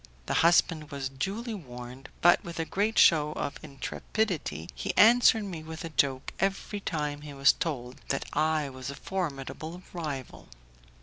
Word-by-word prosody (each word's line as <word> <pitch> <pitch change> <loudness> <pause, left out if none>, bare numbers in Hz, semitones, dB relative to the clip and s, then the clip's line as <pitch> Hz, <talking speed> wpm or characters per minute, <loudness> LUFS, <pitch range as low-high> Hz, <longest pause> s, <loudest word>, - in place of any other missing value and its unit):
The - - -2
husband 165 -2 +3
was 140 -3 -4
duly 200 - -3
warned, 125 - -9
but, 175 +1 +6
with 170 -1 -7
a 165 - 0
great 210 +6 0
show 150 -2 +6
of 145 -1 -4
intrepidity, 150 - -3
he - - -4
answered 230 0 +7 0.2
with 160 +1 -7
a - - -5
joke 135 -4 0
every 195 +2 -1
time 150 -5 -3
he 145 -1 -9
was 140 +1 +6
told 130 -8 -4
that 135 - -1
I 155 0 +1
was 130 0 -7
a 140 - -5
formidable 165 0 -4
rival. 150 -7 -6
155 Hz, 150 wpm, -29 LUFS, 135-180 Hz, 0.2 s, answered